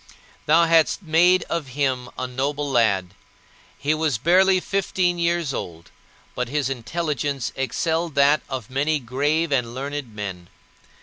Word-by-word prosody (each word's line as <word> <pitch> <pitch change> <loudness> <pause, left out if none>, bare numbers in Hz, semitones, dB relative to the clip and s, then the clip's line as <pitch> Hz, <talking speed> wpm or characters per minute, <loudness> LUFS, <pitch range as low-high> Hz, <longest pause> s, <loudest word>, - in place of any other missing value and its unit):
Thou 165 +3 +5
hadst 165 +4 +3
made 175 +3 +4
of 165 -4 -3
him 130 -3 0
a 130 - -2
noble 140 +3 -2
lad. 100 -7 +2 0.6
He 150 +2 0
was 155 -5 0
barely 185 +8 +4
fifteen 180 -2 -1
years 170 -4 0
old, 85 -6 -7 0.4
but 125 -1 -3
his 140 -1 -1
intelligence 140 0 -2
excelled 160 +4 -1
that 145 +2 +4
of 130 -4 -5
many 145 +4 +1
grave 145 +5 -1
and 125 -3 0
learned 140 -3 -5
men. 95 -4 -6
145 Hz, 135 wpm, -23 LUFS, 125-165 Hz, 0.6 s, Thou